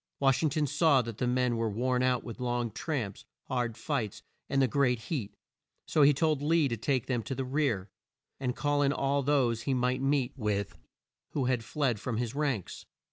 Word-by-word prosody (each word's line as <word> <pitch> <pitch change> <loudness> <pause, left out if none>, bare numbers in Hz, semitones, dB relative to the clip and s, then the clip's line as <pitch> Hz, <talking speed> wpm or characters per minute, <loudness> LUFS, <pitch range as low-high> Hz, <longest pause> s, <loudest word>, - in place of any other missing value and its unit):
Wash 135 -2 +3
ing 160 - +3
ton 150 +1 0
saw 150 -2 +3
that 115 -2 -7
the 125 - +1
men 125 -1 +1
were 115 -1 0
worn 125 +4 0
out 125 -1 +2
with 120 +1 -8
long 120 -2 -1
tramps, 120 - -3 0.2
hard 120 -3 -2
fights, 120 -4 -3 0.3
and 135 - +1
the 135 - +4
great 125 -1 +2
heat, 115 - -4 0.5
so 155 - +2
he 145 0 +8
told 155 0 +1
Lee 155 0 +3
to 115 - -1
take 125 +3 0
them 125 -3 -1
to 115 +5 -4
the 135 - -2
rear, 130 -8 0 0.5
and 125 -2 -2
call 145 -1 +1
in 140 0 +3
all 140 0 +1
those 130 -5 +2
he 130 +3 0
might 125 +1 +1
meet 135 -1 +1
with 105 -5 -2 0.6
who 135 - 0
had 125 -2 +1
fled 125 -2 0
from 110 +2 -3
his 120 0 -2
ranks. 140 - -2
130 Hz, 200 wpm, -30 LUFS, 115-140 Hz, 0.6 s, he